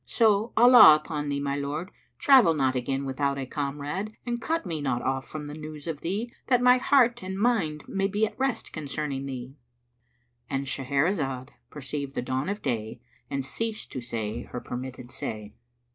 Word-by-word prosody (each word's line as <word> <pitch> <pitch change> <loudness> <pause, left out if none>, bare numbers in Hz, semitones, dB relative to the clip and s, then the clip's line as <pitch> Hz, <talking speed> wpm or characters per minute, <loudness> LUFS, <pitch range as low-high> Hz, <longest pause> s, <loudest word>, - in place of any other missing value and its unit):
So, 220 -1 +3
Allah 245 -8 +10
upon 150 -1 -3
thee, 140 0 -1
O - - -4
my 140 0 -1
lord, 145 +6 -4 0.3
travel 260 - +6
not 135 -3 +2
again 135 +2 -2
without 140 +1 -1
a 135 - -3
comrade 145 +10 -4
and 240 -1 -2
cut 325 -2 -1
me 165 -4 -3
not 130 -4 -1
off 135 0 -1
from 155 -1 -6
news 150 0 -8
of 160 -3 -4
thee, 215 +7 -3
that 250 -2 +4
my 250 +1 +5
heart 245 -3 +3
and 190 +1 -4
mind 195 -10 +1
may 195 0 0
be 205 +2 +1
at 220 - -8
rest 270 -2 -1
concerning 145 -2 -4
thee!"—And 120 0 -9
Shahrazad 135 0 -1 0.2
perceived 140 -1 -5
the - - -1
dawn 130 +6 -2
of 205 +1 -4
day 115 -3 -2 0.3
and 140 -2 -2
ceased 220 +9 -4
to 130 - -5
say 115 -1 -4
her 125 - -6
permitted 125 0 -7
say. 105 -1 -5
145 Hz, 175 wpm, -27 LUFS, 130-195 Hz, 0.3 s, Allah